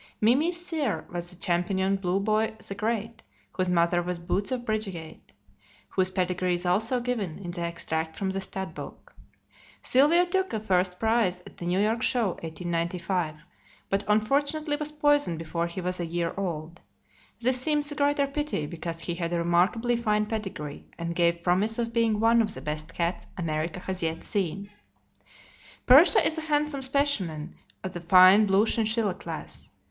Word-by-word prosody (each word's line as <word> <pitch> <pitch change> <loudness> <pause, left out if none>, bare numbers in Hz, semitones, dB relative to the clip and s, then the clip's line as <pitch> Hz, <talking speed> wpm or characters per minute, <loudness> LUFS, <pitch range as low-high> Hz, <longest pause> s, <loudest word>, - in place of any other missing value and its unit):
"Mimi's" 295 +11 +3
sire 300 - -2
was 175 0 -4
the 180 - -11
champion 190 +2 0
Blue 190 0 0
Boy 215 +2 0
the - - -4
Great, 225 +2 -3 0.3
whose 185 -1 -1
mother 175 0 +2
was 180 0 -3
Boots 190 +5 -2
of 245 -2 -2
Bridgeyate, 195 -8 -5 0.6
whose 185 -1 +1
pedigree 180 -1 0
is 175 +1 -2
also 220 +8 +1
given 235 -9 -3
in 180 -3 -6
the 175 0 -6
extract 160 -1 -3
from 195 -2 -1
the 195 0 -3
stud 190 0 -4
book. - - -10 0.7
Sylvio 300 +7 +4
took 380 -2 -1
a 220 - 0
first 180 -3 +1
prize 220 -5 +1
at - - -15
the 175 - -5
New 180 +1 +1
York 220 +3 +1
Show, 245 -5 +2
1895, 170 -1 -3 0.4
but 195 +1 +1
unfortunately 285 +8 +1
was 300 0 -2
poisoned 290 - +2
before 170 +1 -2
he 170 +2 -6
was 180 0 -2
a 175 - -1
year 170 0 -2
old. 170 -3 -4 0.6
This 250 +1 +1
seems 295 +1 0
the - - -4
greater 285 -1 +2
pity, 285 - -2
because 165 +1 -5
he 175 - -2
had 170 -1 -3
a 175 - 0
remarkably 180 +8 +2
fine 210 -2 +1
pedigree, 195 -9 -5
and 170 0 -3
gave 170 0 +1
promise 195 +6 +2
of 230 -1 -2
being 225 -2 +2
one 230 +1 +4
of 210 -2 -2
the - - -7
best 155 +1 -5
cats 170 +1 -2
America 165 0 -2
has 185 0 -4
yet 165 0 -2
seen. 200 0 -3 1.1
Persia 290 +6 +7
is 320 - +2
a 315 0 -8
handsome 295 -1 0
specimen 235 - -1 0.3
of 185 - -5
the 175 - -6
fine 185 +4 +7
blue 195 +2 +4
chinchilla 220 -3 +1
class. 185 - -8
195 Hz, 170 wpm, -27 LUFS, 175-235 Hz, 1.1 s, Persia